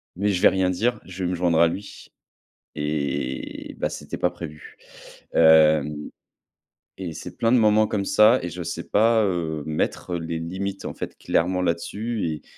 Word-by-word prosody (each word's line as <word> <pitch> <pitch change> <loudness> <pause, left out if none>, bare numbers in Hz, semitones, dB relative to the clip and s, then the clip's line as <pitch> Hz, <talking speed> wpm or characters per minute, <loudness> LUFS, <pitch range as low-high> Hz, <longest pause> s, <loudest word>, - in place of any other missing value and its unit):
mais 100 +3 0
je 90 -2 0
vais - - +8
rien 95 -1 +1
dire. 115 +7 0
Je 95 0 -7
vais 90 - 0
me 90 - -1
joindre 85 -2 +1
à 85 - +6
lui. 100 +4 -7 0.7
Et, 70 -3 -3
bah, - - 0
c'était - - -7
pas 90 - +1
prévu. 80 -4 -10 0.6
Hem, 80 -2 +5 1.0
et 90 -4 -5
c'est - - -9
plein 115 +1 +2
de - - +6
moments 110 0 +4
comme 100 -2 -2
ça 110 +6 +5
et 90 - -4
je 90 +1 -6
sais - - -5
pas, 110 +1 +4
heu, 80 -5 -2
mettre 80 +3 -2
les 80 0 -4
limites, 95 +4 -4
en - - -5
fait, - - -6
clairement, 90 +2 0
là-dessus. 100 +5 -2
Et 75 -1 -5
90 Hz, 175 wpm, -24 LUFS, 80-100 Hz, 1.0 s, vais